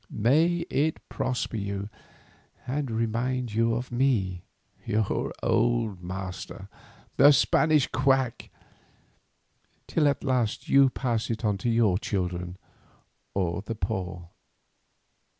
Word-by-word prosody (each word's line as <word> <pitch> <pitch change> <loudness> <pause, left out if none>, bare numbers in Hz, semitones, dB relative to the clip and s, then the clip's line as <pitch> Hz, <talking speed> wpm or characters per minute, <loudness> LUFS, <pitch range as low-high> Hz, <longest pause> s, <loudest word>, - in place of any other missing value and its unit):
May 160 +10 +2
it 150 +3 +1
prosper 125 -2 -2
you, 100 -1 -3 0.8
and 135 +1 -2
remind 115 +2 -1
you 115 +1 +2
of 125 +2 -4
me, 115 -8 +1 0.4
your 105 -1 -1
old - - +1
master, 95 +1 -6 0.5
the 140 +3 +8
Spanish 150 +1 +3
quack, 130 -2 0 1.4
till 155 -3 +2
at 140 - 0
last 125 -5 0
you 140 -1 +6
pass 120 -4 -2
it 115 0 -2
on 100 -2 +1
to 120 - -1
your 110 -5 +3
children 90 -3 -3 0.8
or 90 -3 -1
the 115 +2 -5
poor. 90 -2 -4
115 Hz, 110 wpm, -27 LUFS, 95-130 Hz, 1.4 s, the